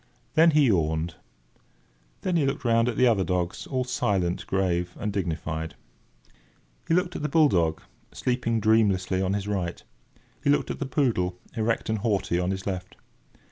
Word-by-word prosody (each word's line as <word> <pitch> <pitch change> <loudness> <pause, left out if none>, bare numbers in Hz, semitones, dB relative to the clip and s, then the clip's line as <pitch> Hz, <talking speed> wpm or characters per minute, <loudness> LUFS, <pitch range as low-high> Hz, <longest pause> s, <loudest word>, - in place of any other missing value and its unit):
Then 165 +2 +6
he 150 -2 +4
yawned. 80 -5 +1 1.1
Then 180 - -1
he 150 -5 +2
looked 135 0 -3
round 115 0 +3
at 120 - -4
the 130 - +5
other 110 -6 +3
dogs, 90 -1 -2
all 130 -2 -1
silent, 95 -8 -1
grave, 90 -2 -1
and 105 0 -2
dignified. 80 -4 -3 1.1
He 165 - +3
looked 180 0 0
at - - -4
the 150 - -1
bull 155 -3 +5
dog, 80 -5 +1 0.3
sleeping 120 -2 -1
dreamlessly 100 -4 +2
on 95 0 0
his 100 0 -3
right. 95 -4 -3 0.6
He - - +1
looked 145 - +2
at - - -6
the 140 - -2
poodle, 110 - 0 0.2
erect 115 +1 0
and 110 -1 0
haughty, 100 -5 0
on 90 0 0
his 95 0 -3
left. 95 -2 -4
100 Hz, 170 wpm, -26 LUFS, 90-125 Hz, 1.1 s, Then